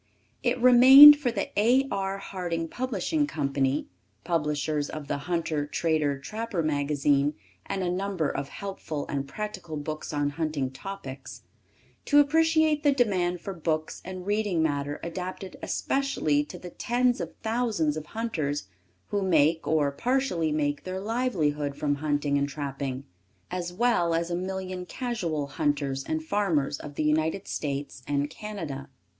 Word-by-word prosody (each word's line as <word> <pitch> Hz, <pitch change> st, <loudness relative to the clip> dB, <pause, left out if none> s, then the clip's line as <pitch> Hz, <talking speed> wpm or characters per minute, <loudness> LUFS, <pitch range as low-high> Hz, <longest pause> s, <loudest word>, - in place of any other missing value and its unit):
It 250 Hz, 0 st, 0 dB
remained 260 Hz, +4 st, +11 dB
for 285 Hz, -4 st, -1 dB
the -, -, -3 dB
A. 250 Hz, +5 st, +4 dB
R. 195 Hz, 0 st, -1 dB
Harding 175 Hz, -4 st, -4 dB
Publishing 260 Hz, -, -1 dB
Co. 140 Hz, -, -2 dB, 0.7 s
(publishers 150 Hz, -3 st, -1 dB
of 155 Hz, -2 st, -7 dB
the -, -, -1 dB
Hunter 160 Hz, -4 st, -1 dB
Trader 150 Hz, -2 st, 0 dB
Trapper 210 Hz, +4 st, -3 dB
magazine 145 Hz, -1 st, +1 dB, 0.3 s
and 195 Hz, -, -2 dB
a 175 Hz, -, 0 dB
number 185 Hz, -3 st, -1 dB
of 140 Hz, 0 st, -3 dB
helpful 190 Hz, -7 st, -5 dB
and 140 Hz, -1 st, -3 dB
practical 185 Hz, -5 st, -5 dB
books 155 Hz, +1 st, -5 dB
on 145 Hz, -1 st, 0 dB
hunting 150 Hz, -4 st, -2 dB
topics), 140 Hz, -4 st, -8 dB, 0.6 s
to 290 Hz, -, +3 dB
appreciate 315 Hz, +1 st, +3 dB
the 290 Hz, -1 st, +4 dB
demand 185 Hz, -9 st, +1 dB
for 195 Hz, -, -5 dB
books 155 Hz, -2 st, -2 dB
and 185 Hz, 0 st, -7 dB
reading 205 Hz, -5 st, +1 dB
matter 145 Hz, -1 st, -1 dB
adapted 185 Hz, +2 st, -5 dB
especially 155 Hz, -, 0 dB
to 180 Hz, -, -9 dB
the 180 Hz, 0 st, -9 dB
tens 245 Hz, +1 st, +1 dB
of -, -, -6 dB
thousands 220 Hz, -10 st, 0 dB
of 155 Hz, -1 st, -6 dB
hunters 155 Hz, -, -3 dB, 0.4 s
who 205 Hz, -, 0 dB
make, 160 Hz, -3 st, +2 dB
or 150 Hz, -3 st, +2 dB
partially 210 Hz, -, 0 dB
make, 145 Hz, -1 st, -1 dB
their 185 Hz, 0 st, -4 dB
livelihood 175 Hz, -, -1 dB
from 145 Hz, -1 st, 0 dB
hunting 145 Hz, -1 st, +1 dB
and 140 Hz, 0 st, 0 dB
trapping, 140 Hz, -2 st, -4 dB, 0.5 s
as 175 Hz, -1 st, -3 dB
well 180 Hz, -5 st, +2 dB
as 170 Hz, +1 st, -1 dB
a -, -, 0 dB
million 185 Hz, 0 st, -4 dB
casual 180 Hz, -, -3 dB
hunters 140 Hz, -2 st, -1 dB
and 155 Hz, +2 st, -2 dB
farmers 160 Hz, -7 st, 0 dB
of 145 Hz, -1 st, -9 dB
the 155 Hz, -, -1 dB
United 155 Hz, +5 st, 0 dB
States 140 Hz, -2 st, -4 dB
and 145 Hz, +1 st, 0 dB
Canada. 160 Hz, -12 st, -6 dB
165 Hz, 145 wpm, -27 LUFS, 145-205 Hz, 0.7 s, remained